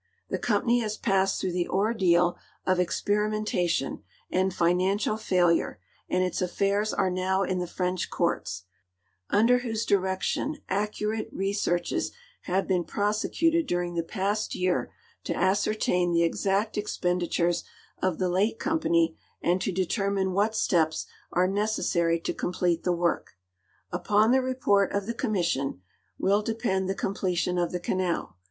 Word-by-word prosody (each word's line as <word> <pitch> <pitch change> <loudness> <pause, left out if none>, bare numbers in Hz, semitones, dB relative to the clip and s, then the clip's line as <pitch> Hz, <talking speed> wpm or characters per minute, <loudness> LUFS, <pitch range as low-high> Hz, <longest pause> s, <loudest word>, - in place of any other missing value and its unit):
The - - -2
com})any 235 +2 +2
has 215 -1 -3
passed 195 -2 +1
through 185 - -1
the 175 0 -1
ordeal 185 -4 +2 0.3
of 185 -1 +2
experimentation 205 -4 0 0.3
and 190 +1 +2
financial 185 +5 +1
fiiilure 180 -5 +2 0.3
and 180 0 +2
its 180 0 -1
affairs 200 +3 +1
are 190 -2 +1
now 190 +1 +1
in 185 -1 -1
the 180 - -2
French 180 0 -2
courts, 95 - -1 0.7
under 230 +4 +4
whose 225 -2 -2
direction 190 +10 0
accurate 210 +2 -2
re 195 +1 -1
searches 175 -4 0 0.3
have 190 +1 0
been 180 -2 +1
])rosecuted 275 - +1
during 175 -2 -1
the 170 - 0
past 200 +4 -2
year 180 0 0 0.3
to - - -1
ascertain 190 -2 +1
the 170 0 +4
exact 200 +5 0
expenditures 175 -3 0 0.4
of 185 -3 +1
the 185 - 0
late 195 +5 +1
company 170 - +1 0.2
and 180 +2 +1
to - - 0
determine 190 +1 0
what 210 +3 +1
steps 160 -6 +1 0.3
are 180 +1 +3
necessary 190 -4 +1
to - - -2
complete 175 -1 0
the 180 - +1
work. 170 - -1 0.6
Upon 215 +2 +3
the 260 +1 +4
report 250 -7 +2
of 200 -1 -1
the 235 - -2
commission 170 - -1 0.3
will 200 +2 +2
depend 210 -4 -1
the 195 - 0
completion 180 -3 -1
of 175 - 0
the 180 - -2
canal. 175 - -2
190 Hz, 140 wpm, -27 LUFS, 175-210 Hz, 0.7 s, under